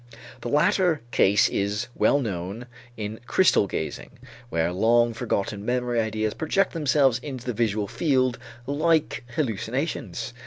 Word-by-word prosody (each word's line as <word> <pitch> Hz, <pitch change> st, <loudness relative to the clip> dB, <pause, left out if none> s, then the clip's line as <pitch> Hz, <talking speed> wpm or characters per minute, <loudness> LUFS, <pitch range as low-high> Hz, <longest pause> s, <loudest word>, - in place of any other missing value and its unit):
The 120 Hz, -, -4 dB
latter 155 Hz, +3 st, +2 dB
case 100 Hz, -2 st, +4 dB
is 100 Hz, +4 st, -1 dB
well 140 Hz, -, +3 dB
known 100 Hz, -1 st, -4 dB, 0.3 s
in 110 Hz, 0 st, -5 dB
crystal 185 Hz, -, +4 dB
gazing, 80 Hz, -4 st, -4 dB, 0.4 s
where 85 Hz, -3 st, 0 dB
long 115 Hz, +4 st, +3 dB
forgotten 105 Hz, -3 st, -2 dB
memory 120 Hz, 0 st, 0 dB
ideas 110 Hz, -1 st, -1 dB
project 190 Hz, +5 st, 0 dB
themselves 140 Hz, -6 st, +2 dB
into 130 Hz, -2 st, -7 dB
the 125 Hz, -, -2 dB
visual 105 Hz, -2 st, 0 dB
field 130 Hz, -, +1 dB, 0.3 s
like 155 Hz, +2 st, +1 dB
hallucinations. 120 Hz, -, -3 dB
120 Hz, 125 wpm, -25 LUFS, 105-140 Hz, 0.4 s, case